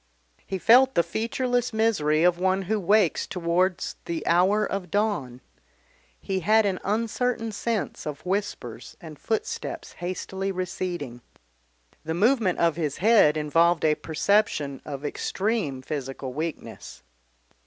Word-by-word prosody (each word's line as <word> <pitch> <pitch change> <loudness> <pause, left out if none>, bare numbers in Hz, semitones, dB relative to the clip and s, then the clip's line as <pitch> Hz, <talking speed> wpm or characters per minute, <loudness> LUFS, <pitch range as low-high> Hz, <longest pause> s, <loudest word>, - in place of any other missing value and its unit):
He 190 - -2
felt 255 +7 +5
the 170 - +4
featureless 245 +3 -1
misery 185 -9 +2
of 175 0 +3
one 190 +1 +1
who 215 +3 -1
wakes 200 -1 +2
towards 180 +1 0
the 165 -2 -4
hour 190 +5 +3
of 190 -3 -4
dawn. 160 - -1 0.8
He 190 -1 -2
had 215 +5 +3
an 190 -2 0
uncertain 230 +2 -1
sense 215 -4 -3
of 150 +2 -6
whispers 200 +2 -4
and - - -11
footsteps 440 0 -3
hastily 190 +2 -4
receding. 175 -8 -4 0.8
The 160 +1 -3
movement 215 -1 +2
of 165 -2 +2
his 150 -4 -2
head 200 -7 +5
involved 165 +2 +2
a 155 - +4
perception 150 -2 0
of 145 0 -6
extreme 175 - -2
physical 135 -2 -5
weakness. 160 +3 -6
185 Hz, 125 wpm, -25 LUFS, 155-215 Hz, 0.8 s, felt